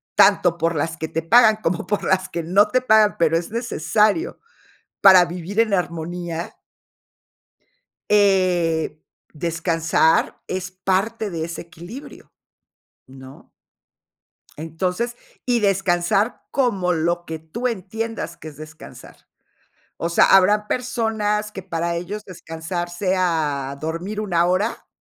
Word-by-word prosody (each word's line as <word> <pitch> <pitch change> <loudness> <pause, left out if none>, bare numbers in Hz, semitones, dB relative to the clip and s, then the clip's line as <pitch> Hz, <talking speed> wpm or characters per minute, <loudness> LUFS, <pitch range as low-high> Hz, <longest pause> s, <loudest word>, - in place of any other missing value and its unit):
tanto 180 -4 +4
por 165 0 0
las 160 +2 -2
que 160 - -4
te 165 - -2
pagan 220 +4 +5
como 180 -4 -2
por 205 - -2
las 185 0 +1
que 170 - -4
no 200 +5 +3
te 255 +4 +2
pagan, 220 -4 +4
pero 165 0 +3
es 170 +4 -5
necesario 225 - 0 0.6
para 190 -2 +8
vivir 180 +4 -5
en 215 -3 0
armonía 170 -1 -3 1.5
eh, 180 -6 +2 0.4
descansar 165 0 +1
es 185 0 -4
parte 195 +4 -1
de 165 -2 -3
ese 170 0 -6
equilibrio, 175 - -12 0.8
¿no? 130 0 -14 1.1
Entonces, 180 +9 -3 0.3
y 245 -1 +2
descansar 195 +1 +1
como 200 -10 +1
lo 170 +1 -1
que 160 0 -5
tú 220 +11 -4
entiendas 225 -2 -5
que 160 - -10
es 145 - -12
descansar. 155 +1 -12 0.8
O 170 - -2
sea, 170 - +4
habrán 205 +2 +5
personas 220 -4 -1
que 195 - -7
para 170 -2 -3
ellos 195 +5 -5
descansar 175 -1 -6
sea 165 -7 -1
dormir 175 +7 -4
una 175 -4 +1
hora, 185 +6 -1
180 Hz, 120 wpm, -21 LUFS, 165-210 Hz, 1.5 s, para